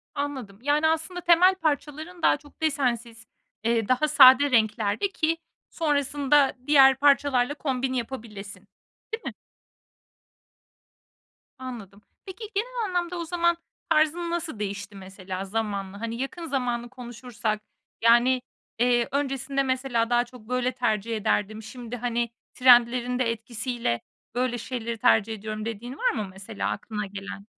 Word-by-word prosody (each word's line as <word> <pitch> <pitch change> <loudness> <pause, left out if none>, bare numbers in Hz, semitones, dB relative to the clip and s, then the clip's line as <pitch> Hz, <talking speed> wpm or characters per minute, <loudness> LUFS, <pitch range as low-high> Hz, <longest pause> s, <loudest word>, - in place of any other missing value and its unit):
Anladım. 260 -9 -4
Yani, 295 +3 +2
aslında 325 +3 -1
temel 355 +2 +5
parçaların 310 +1 -3
daha - - +4
çok 290 +2 -20
desensiz, 240 -6 -1 0.4
eee, 230 -2 +1
daha 255 +4 +2
sade 285 -1 +7
renklerde 220 - +2
ki 325 -3 0 0.3
sonrasında 285 -2 +2
diğer 270 -2 +7
parçalarla 280 -2 +3
kombin 265 -3 -2
yapabilesin. 215 -6 -6 0.6
Değil 455 - -17
mi? - - -4 2.3
Anladım. 220 -6 -8 0.2
Peki, 390 +3 -9
genel 475 +2 -1
anlamda 355 -2 -2
o 340 - -4
zaman, 340 0 +1 0.3
tarzın 315 +3 +2
nasıl 335 -9 -3
değişti, 200 0 -5
mesela, 190 0 -7
zamanla? 200 -1 -3
Hani, 230 0 -3
yakın 330 +5 -5
zamanı 245 -5 -2
konuşursak, 240 -3 -4 0.4
yani, 240 +3 +5 0.4
eee, 240 -1 +3
"Öncesinde, 275 -1 -1
mesela, 255 -3 0
daha 240 0 +3
çok 240 -2 -15
böyle 250 0 0
tercih 230 -2 -1
ederdim, 215 +1 -1
şimdi, 240 +1 -7
hani, 240 0 -1 0.2
trendlerin 245 0 +4
de 235 -2 +2
etkisiyle 230 - -3 0.3
böyle 250 -1 0
şeyleri 235 -1 -4
tercih 225 -2 +3
ediyorum." 215 0 -5
dediğin 235 +4 -6
var - - +2
mı, 210 - -3
mesela, 195 +3 -5
aklına 210 0 -4
gelen? 200 0 -8
250 Hz, 130 wpm, -26 LUFS, 225-290 Hz, 2.3 s, sade